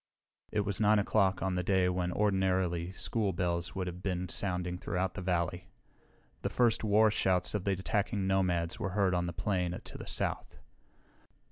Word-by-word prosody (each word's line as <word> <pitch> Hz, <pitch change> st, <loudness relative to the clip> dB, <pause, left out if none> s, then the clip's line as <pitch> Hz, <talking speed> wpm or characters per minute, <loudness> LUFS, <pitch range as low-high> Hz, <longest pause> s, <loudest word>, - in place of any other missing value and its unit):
It 105 Hz, -, +1 dB
was 100 Hz, +1 st, -2 dB
9 105 Hz, 0 st, +5 dB
o'clock, 100 Hz, -2 st, +2 dB
on 95 Hz, -1 st, 0 dB
a -, -, +1 dB
day 95 Hz, 0 st, +2 dB
when 90 Hz, -1 st, 0 dB
ordinarily 95 Hz, -3 st, +1 dB
school 100 Hz, 0 st, -1 dB
bells 85 Hz, 0 st, -2 dB
would 95 Hz, -1 st, -2 dB
have 90 Hz, 0 st, -6 dB
been 90 Hz, -2 st, -2 dB
sounding 90 Hz, -1 st, -2 dB
throughout 95 Hz, 0 st, -2 dB
the 105 Hz, -, -5 dB
valley. 90 Hz, -1 st, -1 dB, 0.7 s
The -, -, -1 dB
first 120 Hz, -3 st, +2 dB
war 110 Hz, 0 st, +4 dB
shouts 95 Hz, -3 st, +1 dB
of 105 Hz, -3 st, -2 dB
the 100 Hz, -, +2 dB
attacking 100 Hz, +1 st, -1 dB
nomads 90 Hz, -3 st, +1 dB
were 95 Hz, -, -1 dB
heard 95 Hz, -3 st, +3 dB
on 90 Hz, 0 st, 0 dB
the -, -, -2 dB
plain 90 Hz, 0 st, -1 dB
to -, -, -10 dB
the -, -, -8 dB
south. -, -, -3 dB
95 Hz, 175 wpm, -31 LUFS, 90-100 Hz, 0.7 s, 9